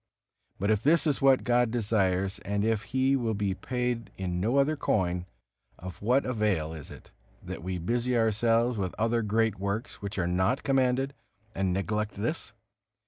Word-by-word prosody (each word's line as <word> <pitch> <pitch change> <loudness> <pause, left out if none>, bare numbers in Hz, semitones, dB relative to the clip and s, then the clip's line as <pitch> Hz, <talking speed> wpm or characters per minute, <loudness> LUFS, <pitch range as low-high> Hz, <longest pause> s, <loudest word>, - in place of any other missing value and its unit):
But 100 +3 +1
if 105 -1 +2
this 160 +5 +4
is 150 -3 +1
what 135 -1 +5
God 120 -1 +3
desires, 100 -5 0
and 100 +1 -1
if 110 -2 0
He 130 +1 +2
will 115 -4 0
be 100 -1 0
paid 125 +2 -3
in 90 -2 -2
no 115 +7 +1
other 140 +3 +3
coin, 90 -9 0 0.5
of 90 0 -9
what 125 +6 +2
avail 105 -10 0
is 75 -4 -9
it, - - -13 0.3
that - - -6
we 90 +2 -3
busy 120 +7 0
ourselves 115 +1 +2
with 95 -2 -2
other 115 +1 +1
great 110 -1 +1
works 100 +4 -3
which 100 0 -5
are 90 - +1
not 95 +8 +1
commanded, 135 0 +1 0.4
and 95 -1 0
neglect 105 +3 -1
this? 120 +11 -3
110 Hz, 170 wpm, -28 LUFS, 95-125 Hz, 0.5 s, what